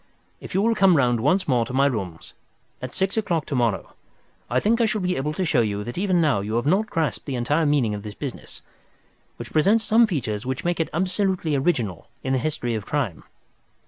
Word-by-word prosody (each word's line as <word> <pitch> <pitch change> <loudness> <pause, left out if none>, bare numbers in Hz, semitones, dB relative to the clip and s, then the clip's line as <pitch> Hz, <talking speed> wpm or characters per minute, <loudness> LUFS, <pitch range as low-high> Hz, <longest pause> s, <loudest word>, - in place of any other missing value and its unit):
If - - -9
you 195 - +3
will 230 +1 +3
come 190 -6 +4
round 120 -3 +2
once 185 - +2
more 125 -4 +3
to 115 - -7
my 135 +1 +4
rooms 95 -11 -3 0.5
at 130 0 -5
six 190 - -1
o'clock 175 -7 0
to - - -5
morrow, 115 -6 0 0.6
I 125 +2 +2
think 230 - +2
I - - +4
shall 215 -1 0
be 180 -1 0
able 140 +3 -1
to 185 +4 -1
show 145 -7 +3
you 105 -2 -1
that 120 +3 -6
even 185 -1 +1
now 150 -9 +3
you 105 +3 -3
have 120 - 0
not 195 +8 +2
grasped 160 -3 -2
the 135 - -2
entire 145 +6 +1
meaning 135 -7 +2
of 105 - -5
this 105 0 -8
business, 140 -4 -7 0.7
which - - -8
presents 200 +8 +3
some 225 +2 +4
features 110 - -2
which 130 +3 -4
make 175 -1 0
it 165 - 0
absolutely 185 -2 0
original 125 - -1 0.2
in 130 - -1
the 130 - +2
history 130 -4 -2
of 110 -2 -3
crime. 125 - -3
145 Hz, 220 wpm, -23 LUFS, 120-185 Hz, 0.7 s, come